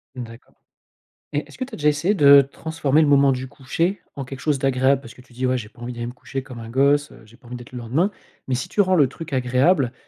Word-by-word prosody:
D'accord 115 -2 -10 0.8
et 145 - 0
est-ce - - -15
que 255 - -3
tu 265 - -17
as - - -6
déjà 150 - 0
essayé 150 +7 +1
de 140 -6 +8
transformer 155 +1 0
le 155 - +3
moment 140 -1 +5
du 130 0 -3
coucher 165 +8 -2 0.2
en 140 - -4
quelque 130 0 -8
chose 145 -1 0
d'agréable? 135 0 +2
Parce 120 -2 -13
que 125 - -15
tu 125 -1 -21
dis: 130 +2 -1
«Ouais 130 0 +1
j'ai 115 -3 -6
pas 120 +2 -19
envie 120 - -5
d'aller 120 -1 -5
me 120 - -5
coucher 130 +1 -6
comme 125 -3 -10
un 115 0 -8
gosse, 140 +3 +2
heu, - - -15
j'ai 115 +2 -19
pas 125 - -19
envie 125 - -7
d'être 120 0 -11
le 125 - -6
lendemain». 140 - 0 0.4
Mais 130 - -1
si 125 - -2
tu - - -6
rends 185 -1 +2
le 150 -7 +5
truc 160 +3 -9
agréable 130 +2 +2
135 Hz, 275 wpm, -22 LUFS, 125-145 Hz, 0.8 s, de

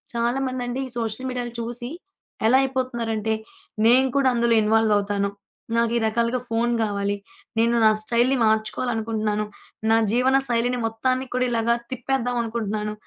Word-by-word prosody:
చాలా 235 +3 0
మంది 255 -1 -3
అండి 245 +2 -3
ఈ - - -12
సోషల్ 230 +3 -3
మీడియా 250 -1 -3 0.2
చూసి 240 +1 -4 0.6
ఎలా 255 +3 +6
అయిపోతున్నారు 255 -3 -2
అంటే, 220 +1 0 0.5
నేను 255 +3 +6
కూడా 275 -1 +3
అందులో 235 -1 +2
ఇన్వాల్వ్ 220 0 +3
అవుతాను, 200 0 0 0.5
నాకు 230 0 +2
ఈ - - +2
రకాలుగా 230 +3 +1
ఫోను 235 +1 0
గావాలి, 200 -1 -1 0.4
నేను 235 +1 +3
నా - - +8
స్టైల్‌ని 245 +4 +2
మార్చుకోవాలి 220 +3 0
అనుకుంటున్నాను, 215 -1 -1 0.5
నా 225 - +5
జీవన 255 +3 +3
శైలిని 245 +1 0
మొత్తాన్ని 255 +4 -1
కూడా 255 0 +2
ఇలాగా 235 0 +2 0.2
తిప్పేద్దాం 250 -1 -1
అనుకుంటున్నాను, 215 -2 -3
235 Hz, 150 wpm, -23 LUFS, 220-250 Hz, 0.6 s, నా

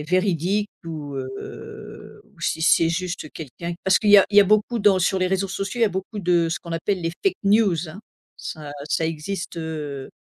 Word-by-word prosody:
est 150 - -8
véridique 185 +3 +1 0.2
ou 150 -4 -6
heu, 130 0 -8
ou - - -24
si 160 - -1
c'est 165 0 +5
juste 175 -2 -3
quelqu'un 170 +3 -6
parce 190 -1 +4
qu'il 215 - 0
y 205 - +10
a - - +6
il 205 - 0
y - - +11
a - - +6
beaucoup 215 +4 +2
dans 200 -2 +4
sur 190 +2 +1
les 185 - +1
réseaux 190 +1 0
sociaux, 195 +4 -4
il - - +4
y - - +6
a - - +1
beaucoup 190 +3 -5
de 175 -3 +2
ce 165 - -2
qu'on 170 - -8
appelle 175 +2 -1
les 165 0 -1
fake 390 - +2
news 195 -6 +3
hein, 185 - -10 0.4
ça 155 -3 -7 0.2
ça 165 - +1
existe, 170 +3 -4
heu 150 -4 -5
175 Hz, 225 wpm, -23 LUFS, 160-195 Hz, 0.4 s, y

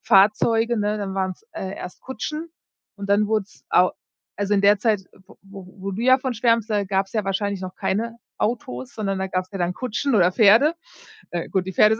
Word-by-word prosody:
Fahrzeuge, 225 +2 +4
ne 210 +1 0
dann 195 -2 -4
waren's, 190 - -3
äh, 190 0 -5
erst 180 - -8
Kutschen 305 +5 -5 0.5
und 200 0 -6
dann 205 +1 +4
wurde 215 -1 +1
es - - -23
au 180 +1 +5 0.5
also, 205 0 -1
in 200 - +4
der 200 +1 +5
Zeit, 215 -1 +2
w 190 - -19
wo 195 -1 -11
wo 195 +1 -4
du 210 +5 -4
ja 260 +1 +6
von 255 -1 -3
schwärmst, 230 -1 +2
da 205 -1 +1
gab's 195 0 -1
ja 215 -2 0
wahrscheinlich 200 0 -1
noch 185 0 -6
keine 230 +4 -2 0.2
Autos, 130 - -3
sondern 195 -3 -2
da 190 0 -2
gab's 185 0 -2
ja - - -4
dann 175 0 0
Kutschen 255 +4 -1
oder 180 -4 +5
Pferde. 225 - +6 0.6
Äh, 175 -1 -3
gut, 185 -1 0
die 190 - -4
Pferde 215 +5 +5
205 Hz, 210 wpm, -23 LUFS, 190-225 Hz, 0.6 s, ja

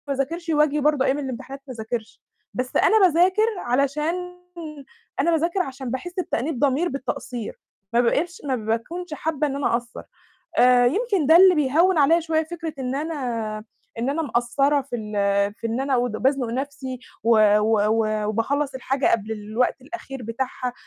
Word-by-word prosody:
ما 280 - 0
أذاكرش 330 +6 -3
وآجي 300 -1 +2
برضه 295 -2 +2
أيام 275 +2 +1
الإمتحانات 270 0 -6
ما 260 - -6
أذاكرش، 220 -1 -6 0.3
بس 255 0 -4
أنا 425 -3 +5
باذاكر 370 +6 +3
علشان 280 +6 0 1.0
أنا 335 +5 +3
باذاكر 335 +3 +1
عشان 265 -7 -3
باحس 350 +8 -5
بتأنيب 285 -5 -2
ضمير 285 +5 +2
بالتقصير، 255 -4 -5 0.3
ما 235 - +4
بقِتش 335 +9 0
ما 265 -2 0
باكونش 240 +11 -3
حابة 305 -1 -1
إن 275 - -3
أنا 280 -3 0
أقصَّر، 235 0 -6 0.6
آآ، 250 0 +6
يمكن 390 - +1
ده 320 +3 +7
اللي 370 +1 +8
بيهوّن 320 +5 +3
عليَّ 315 +4 +5
شوية 320 0 0
فكرة 330 0 -6
إن 260 -1 -3
أنا 240 -8 -3 0.3
إن 240 +4 0
أنا 320 +3 -1
مقصّرة 275 +2 +1
في 260 -2 -5
ال 215 -2 -7 0.4
في 230 - -5
إن 230 +3 -2
أنا 270 -1 +1
ود 245 -1 0
بازنُق 260 +2 0
نفْسي 265 0 -4 0.3
و 230 - +2 0.3
و 215 +1 +2
و 215 -1 +1
وباخلّص 270 +6 -1
الحاجة 265 +1 -1
قبل 220 0 0
الوقت 220 +5 -1
الأخير 270 -3 -8
بتاعها، 250 +2 -3
270 Hz, 165 wpm, -23 LUFS, 240-315 Hz, 1.0 s, اللي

